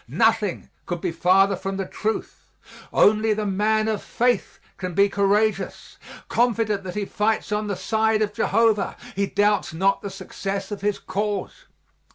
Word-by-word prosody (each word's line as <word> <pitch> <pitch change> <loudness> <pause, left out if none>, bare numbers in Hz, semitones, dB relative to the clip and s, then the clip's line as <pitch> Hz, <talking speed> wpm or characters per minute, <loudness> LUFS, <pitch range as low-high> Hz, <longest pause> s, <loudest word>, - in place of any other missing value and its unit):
Nothing 215 - +1 0.2
could 175 -1 -3
be - - -2
farther 190 +4 +3
from 195 +1 -4
the 195 - -2
truth. 220 +4 -4 0.4
Only 215 +1 +4
the 215 0 -2
man 215 +2 +1
of 215 -2 -1
faith 245 +1 0 0.2
can 185 -3 -5
be 200 0 +4
courageous. 205 +2 0 0.3
Confident 225 -4 +1
that 180 - -6
he 210 -1 -1
fights 210 +2 -1
on 210 0 -1
the 200 - -2
side 220 +1 +1
of 210 -1 -3
Jehovah, 215 0 +1 0.2
he 200 +1 0
doubts 205 -5 +1
not 195 +4 +2
the 200 - -5
success 195 +1 -5
of 205 - -5
his 205 0 0
cause. 205 +1 -4
205 Hz, 160 wpm, -23 LUFS, 195-215 Hz, 0.4 s, Only